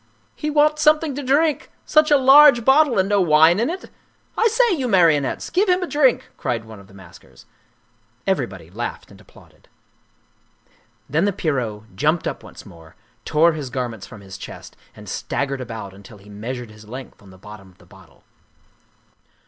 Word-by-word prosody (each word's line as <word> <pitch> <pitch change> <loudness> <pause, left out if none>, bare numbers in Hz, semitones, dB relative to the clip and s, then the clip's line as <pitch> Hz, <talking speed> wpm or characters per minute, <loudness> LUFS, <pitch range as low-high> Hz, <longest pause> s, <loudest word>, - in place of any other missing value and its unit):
" - - -39
He 300 - -4
wants 300 0 +2
something 305 -1 +3
to 285 - -5
drink! 290 +3 0 0.2
Such 305 0 +3
a 295 - +5
large 270 -2 +6
bottle 270 -3 +4
and 190 0 +2
no 200 -1 +2
wine 160 +2 +4
in 235 - 0
it? 365 +2 -7 0.4
I 450 - +2
say, 460 0 +2
you 270 -7 -2
marionettes, 165 - +1
give 380 +3 +1
him 365 +1 +2
a - - -4
drink," 285 -6 +1
cried 115 -2 -3
one 110 -2 -12
of 100 - -16
the 100 - -19
maskers. 95 -3 -17 0.8
Everybody - - -3
laughed - - -6
and - - -16
applauded. - - -21 1.4
Then 160 +5 0
the 205 - +1
Pierrot 115 - -4
jumped 155 - 0
up - - -5
once - - -14
more, 80 -1 -16 0.3
tore 160 +2 +3
his 145 -4 -6
garments 120 -5 -5
from 105 - -13
his 95 -1 -11
chest - - -11 0.2
and - - -13
staggered 140 -1 -3
about 110 -5 -8
until 100 +2 -15
he 100 +1 -18
measured 120 +3 -7
his 105 0 -16
length 130 +2 -10
on 100 - -17
the 95 - -16
bottom 105 0 -13
of 90 - -24
the - - -21
bottle. - - -20
155 Hz, 180 wpm, -20 LUFS, -, 1.4 s, large